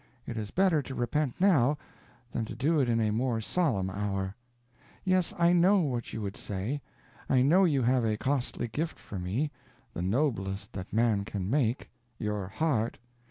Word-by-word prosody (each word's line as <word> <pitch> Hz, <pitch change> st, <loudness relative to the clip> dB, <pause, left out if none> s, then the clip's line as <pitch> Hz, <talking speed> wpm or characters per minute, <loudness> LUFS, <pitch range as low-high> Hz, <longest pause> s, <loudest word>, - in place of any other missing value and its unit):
It 115 Hz, -, -5 dB
is 105 Hz, -2 st, -4 dB
better 185 Hz, -5 st, +3 dB
to 130 Hz, 0 st, -7 dB
repent 125 Hz, +3 st, -1 dB
now, 150 Hz, -8 st, +4 dB, 0.5 s
than 115 Hz, -, -1 dB
to -, -, -7 dB
do 155 Hz, +4 st, +2 dB
it 130 Hz, -3 st, +2 dB
in 115 Hz, -1 st, +2 dB
a 110 Hz, -1 st, +2 dB
more 120 Hz, +1 st, 0 dB
solemn 110 Hz, -, 0 dB
hour. 100 Hz, -1 st, -2 dB, 0.7 s
Yes, 185 Hz, -2 st, +2 dB
I 170 Hz, 0 st, +4 dB
know 185 Hz, +3 st, +5 dB
what 125 Hz, -7 st, -2 dB
you 110 Hz, -, -4 dB
would 100 Hz, 0 st, -4 dB
say. 105 Hz, +9 st, -3 dB, 0.5 s
I 130 Hz, -2 st, +4 dB
know 180 Hz, +8 st, +5 dB
you 140 Hz, -7 st, +2 dB
have 125 Hz, +1 st, +3 dB
a 110 Hz, -1 st, +1 dB
costly 130 Hz, -1 st, -1 dB
gift 155 Hz, +9 st, -3 dB
for 100 Hz, -, -7 dB
me 110 Hz, +12 st, -1 dB, 0.4 s
the -, -, -4 dB
noblest 95 Hz, -2 st, -1 dB
that 95 Hz, 0 st, -6 dB
man 110 Hz, -3 st, +2 dB
can 100 Hz, -2 st, -4 dB
make 130 Hz, -3 st, 0 dB, 0.3 s
_your 105 Hz, -3 st, -2 dB
heart! 120 Hz, -2 st, 0 dB
120 Hz, 175 wpm, -29 LUFS, 105-150 Hz, 0.7 s, know